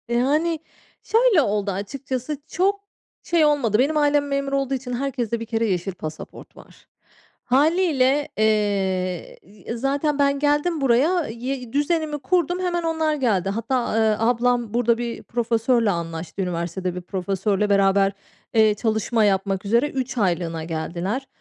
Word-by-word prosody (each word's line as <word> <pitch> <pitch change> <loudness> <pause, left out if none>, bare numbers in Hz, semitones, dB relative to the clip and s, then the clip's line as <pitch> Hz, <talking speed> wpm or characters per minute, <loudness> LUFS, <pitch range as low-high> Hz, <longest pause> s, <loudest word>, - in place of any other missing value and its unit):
Yani, 300 +7 +1 0.4
şöyle 455 -6 +4
oldu, 205 -4 0
açıkçası 255 +8 -4
çok 395 +3 0 0.4
şey 335 -3 +3
olmadı. 260 -8 +2
Benim 295 +4 +2
ailem 290 -1 +2
memur 275 0 -2
olduğu 275 -1 0
için 255 -1 -4
herkeste 240 -3 -2
bir 230 - -5
kere 230 0 -1
yeşil 190 -2 -1
pasaport 155 -3 -9
var. - - -17 0.6
Hâliyle, 290 -1 +2
eee, 195 -4 0 0.3
e, 235 - -4
zaten 280 +3 0
ben 280 0 +2
geldim 295 +3 +1
buraya, 285 +7 +2
y 245 +1 -5
düzenimi 300 +1 0
kurdum, 350 +5 0
hemen 350 -2 -1
onlar 320 -2 0
geldi. 210 -9 0
Hatta, 230 +3 -1
eee, 220 -1 +3
ablam 240 -1 +1
burada 235 -1 +2
bir 235 -1 -5
profesörle 230 0 +1
anlaştı. 170 +1 -4
Üniversitede 180 0 -3
bir 180 - -5
profesörle 195 +2 -1
beraber, 195 0 +3 0.4
eee, 220 -2 +5
çalışma 220 +1 0
yapmak 195 -1 0
üzere 235 +8 +2
3 260 -2 -4
aylığına 170 -5 0
geldiler. 175 +10 -3
240 Hz, 135 wpm, -23 LUFS, 200-285 Hz, 0.6 s, eee